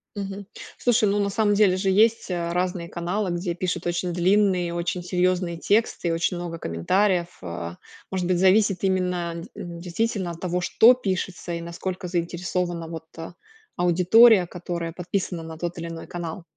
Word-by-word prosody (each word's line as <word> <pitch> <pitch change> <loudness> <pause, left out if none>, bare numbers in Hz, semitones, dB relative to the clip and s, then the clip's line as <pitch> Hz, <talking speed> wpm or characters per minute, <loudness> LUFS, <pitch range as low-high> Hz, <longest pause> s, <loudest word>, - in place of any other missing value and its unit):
Мгм. 200 0 -5 0.3
Слушай, 240 -3 +3
ну, 205 +1 +1
на 200 -1 +1
самом 205 0 +2
деле 200 -3 +4
же 190 +1 0
есть, 220 +1 +3
а, 170 -1 -2
разные 180 -1 -1
каналы, 180 +4 -2
где 175 0 -2
пишут 175 0 -3
очень 175 +1 -1
длинные 185 0 +2
и - - -5
очень 175 +1 -2
серьезные 180 -1 0
тексты, 205 +1 +1
и - - +1
очень 165 +2 0
много 175 -1 -5
комментариев, 175 - +1 0.2
э, 85 -1 -5 0.4
может 185 -2 -1
быть, 180 -1 +1
зависит 195 0 +3
именно 180 -3 0 0.2
д 170 -1 -7
действительно 185 +1 -2
от 170 - -9
того, 180 0 -1
что 225 +7 +6
пишется 190 -6 -3
и 170 - -3
насколько 180 +2 -5
заинтересована 175 0 -2
вот, 160 -1 -7
э, 165 +1 -7 0.4
аудитория, 185 +4 +6
которая 170 -1 -5
подписана 180 0 -3
на 160 0 -8
тот 175 +1 -4
или 170 0 -5
иной 165 -1 -7
канал. 175 0 -6
180 Hz, 170 wpm, -24 LUFS, 170-195 Hz, 0.4 s, что